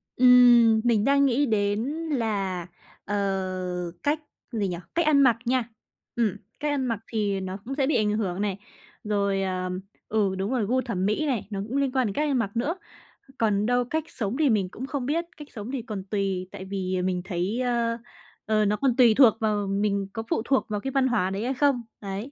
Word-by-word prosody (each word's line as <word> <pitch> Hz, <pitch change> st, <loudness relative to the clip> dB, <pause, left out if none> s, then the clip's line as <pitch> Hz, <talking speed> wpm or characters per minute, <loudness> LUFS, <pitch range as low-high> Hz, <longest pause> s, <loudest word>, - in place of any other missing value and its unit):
Ừm, 240 Hz, -3 st, +7 dB
mình 225 Hz, -3 st, +2 dB
đang 280 Hz, 0 st, +4 dB
nghĩ 275 Hz, +2 st, +2 dB
đến 205 Hz, -1 st, +1 dB, 0.3 s
là, 195 Hz, -, -1 dB, 0.4 s
ờ, 205 Hz, -, -2 dB, 0.9 s
cách 295 Hz, +2 st, +1 dB, 0.3 s
gì 210 Hz, -4 st, -1 dB
nhỉ? 175 Hz, -1 st, -3 dB, 0.2 s
Cách 340 Hz, -2 st, +2 dB
ăn 290 Hz, -2 st, +5 dB
mặc 240 Hz, -4 st, +5 dB
nha. 245 Hz, -1 st, 0 dB, 0.5 s
Ừm, 215 Hz, -4 st, +1 dB, 0.2 s
cách 295 Hz, 0 st, -1 dB
ăn 265 Hz, -2 st, -1 dB
mặc 230 Hz, -4 st, -1 dB
thì 205 Hz, -3 st, 0 dB
nó 190 Hz, 0 st, -5 dB
cũng 270 Hz, +3 st, -4 dB
sẽ 275 Hz, -2 st, +1 dB
bị 305 Hz, -, +1 dB
ảnh 210 Hz, -1 st, +2 dB
hưởng 190 Hz, -2 st, -2 dB
này. 200 Hz, -2 st, -1 dB, 0.5 s
Rồi, 200 Hz, -2 st, 0 dB
ờ, 185 Hz, -1 st, -2 dB, 0.4 s
ừ, 205 Hz, -3 st, +1 dB
đúng 195 Hz, +5 st, -2 dB
rồi, 245 Hz, -5 st, +1 dB
gu 255 Hz, +5 st, +1 dB
thẩm 195 Hz, -7 st, -2 dB
mỹ 215 Hz, +9 st, +1 dB
này, 255 Hz, -8 st, -1 dB
nó 200 Hz, -2 st, -4 dB
cũng 265 Hz, +5 st, -2 dB
liên 275 Hz, -2 st, +1 dB
quan 260 Hz, -3 st, +1 dB
đến 200 Hz, -, -3 dB
cách 300 Hz, 0 st, 0 dB
ăn 270 Hz, -, +2 dB
mặc 200 Hz, -4 st, -1 dB
nữa. 290 Hz, +9 st, 0 dB, 0.6 s
Còn 210 Hz, -2 st, +1 dB
đâu 245 Hz, +1 st, +2 dB
cách 315 Hz, +5 st, -2 dB
sống 235 Hz, -2 st, -3 dB
thì 300 Hz, -4 st, +3 dB
mình 200 Hz, -5 st, +1 dB
cũng 260 Hz, -, -6 dB
không 270 Hz, -2 st, -3 dB
biết, 330 Hz, +5 st, 0 dB
cách 295 Hz, -, -10 dB
sống 220 Hz, +1 st, -6 dB
thì 270 Hz, -3 st, -3 dB
còn 210 Hz, -4 st, -6 dB
tùy 195 Hz, -2 st, -2 dB
tại 190 Hz, -, -8 dB
vì 185 Hz, -1 st, -2 dB
mình 180 Hz, -1 st, -1 dB
thấy, 190 Hz, +5 st, -2 dB
ơ, 235 Hz, -2 st, 0 dB, 0.5 s
ờ, 215 Hz, -1 st, +2 dB
nó 210 Hz, +1 st, +2 dB
còn 265 Hz, -4 st, +1 dB
tùy 240 Hz, -4 st, +6 dB
thuộc 250 Hz, -6 st, +8 dB
vào 210 Hz, -2 st, 0 dB
mình 200 Hz, 0 st, 0 dB
có 225 Hz, -, -4 dB
phụ -, -, +1 dB
thuộc 270 Hz, +1 st, +2 dB
vào 210 Hz, -, -1 dB
cái 270 Hz, +6 st, -4 dB
văn 270 Hz, -1 st, +2 dB
hóa 215 Hz, -7 st, +1 dB
đấy 195 Hz, +2 st, -3 dB
hay 260 Hz, -, 0 dB
không, 270 Hz, -2 st, +2 dB, 0.2 s
đấy. 200 Hz, +7 st, -5 dB
220 Hz, 220 wpm, -26 LUFS, 200-260 Hz, 0.9 s, thuộc